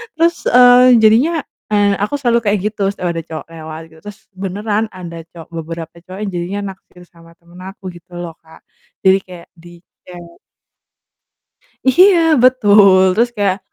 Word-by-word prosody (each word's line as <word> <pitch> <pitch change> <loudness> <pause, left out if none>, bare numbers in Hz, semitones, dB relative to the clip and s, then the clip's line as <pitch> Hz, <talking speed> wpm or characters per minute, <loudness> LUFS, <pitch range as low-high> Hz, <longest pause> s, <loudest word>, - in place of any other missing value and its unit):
Terus, 335 +1 +2
eee, 245 -1 +6
jadinya, 280 +9 +3 0.3
eee 205 -1 +2
aku 250 +8 -2
selalu 235 -3 +1
kayak 205 -1 +1
gitu 205 -2 -5
setiap 180 -3 -4
ada 165 - -4
cowok 160 -2 -8
lewat 160 0 -9
gitu, 160 - -19
terus 210 +1 -10 0.2
beneran 205 +3 -3
ada 175 -3 -9 0.2
cowok 165 -1 -13
beberapa 165 0 -8
cowok 185 +1 -10
yang 205 - -3
jadinya 175 +4 -4
naksir 180 -1 -21
sama 165 -1 -20
temen 170 +1 -19
aku, 195 0 -13
gitu 175 +1 -18
loh 170 -2 -7
Kak. 160 - -19 0.4
Jadi 190 0 +5
kayak 180 -2 -13
di-chat. 175 0 -16 1.5
Iya, 365 +6 +5 0.2
betul. 205 -6 +5
Terus 235 +2 +2
kayak 200 -1 0
195 Hz, 155 wpm, -16 LUFS, 170-220 Hz, 1.5 s, eee